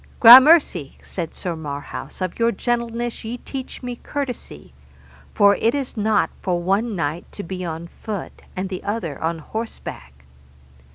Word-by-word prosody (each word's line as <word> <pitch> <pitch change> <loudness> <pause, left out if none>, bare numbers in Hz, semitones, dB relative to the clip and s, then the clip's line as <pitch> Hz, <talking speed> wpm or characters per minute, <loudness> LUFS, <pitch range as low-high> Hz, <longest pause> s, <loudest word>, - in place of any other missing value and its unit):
Gramercy, 250 - +8
said 170 -4 -5
Sir 175 -2 -4
Marhaus, 145 0 -7
of 185 +2 -3
your 230 0 +3
gentleness 235 +1 -2
ye 230 +2 -4
teach 260 +1 -7
me 245 -1 -5
courtesy, 275 -3 -6 0.6
for 200 -1 +6
it 230 +4 +1
is 275 -3 -3
not 215 -1 +1
for 180 -2 0
one 200 +5 0
knight 160 0 -3
to 205 - -6
be 185 +1 -5
on 165 -1 -5
foot, 205 +2 -7
and 185 +1 -3
the 185 -2 -5
other 200 -9 -3
on 165 +1 -1
horseback. 110 - -7
200 Hz, 150 wpm, -22 LUFS, 170-235 Hz, 0.6 s, Gramercy